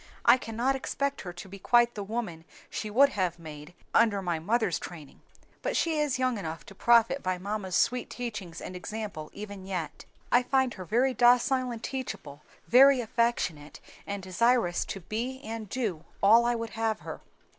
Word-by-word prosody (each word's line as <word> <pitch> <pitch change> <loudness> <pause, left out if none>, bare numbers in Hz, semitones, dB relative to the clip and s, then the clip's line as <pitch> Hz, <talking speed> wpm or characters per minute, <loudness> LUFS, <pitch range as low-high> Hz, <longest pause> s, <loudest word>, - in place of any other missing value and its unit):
"I 235 +2 +8
cannot 240 +4 -1
expect 280 +1 -2
her 180 -2 -7
to 175 +2 -9
be 195 +1 -10
quite 240 +4 +4
the 210 - -5
woman 200 -6 -4 0.3
she 215 - -4
would 270 +7 +5
have 185 - -1
made 155 0 -10 0.2
under 220 -3 +4
my 175 -4 -2
mother's 215 +1 0
training; 155 -5 -10 0.4
but - - -1
she 320 -2 +1
is 295 -4 +1
young 255 -3 0
enough 160 -3 -6
to - - -12
profit 235 +5 +4
by 185 0 -1
mamma's 195 -1 -3
sweet 250 0 +1
teachings 215 -9 -6
and 185 - -7
example 200 -5 -6
even 205 -2 -8
yet. 180 -6 -5 0.3
I 245 - +6
find 260 -1 +1
her 185 - -8
very 245 +8 +2
docile 250 +1 +4
and 235 -1 -6
teachable, 255 - -5 0.3
very 270 +2 +7
affectionate, 225 -10 -1 0.3
and 200 -1 -4
desirous 190 0 +2
to 195 - -6
be 235 +8 -4
and 220 -2 -6
do 205 -11 -2 0.2
all 225 +4 +7
I 240 - +2
would 230 -1 -4
have 220 -1 -1
her." - - -7
220 Hz, 175 wpm, -28 LUFS, 185-245 Hz, 0.4 s, I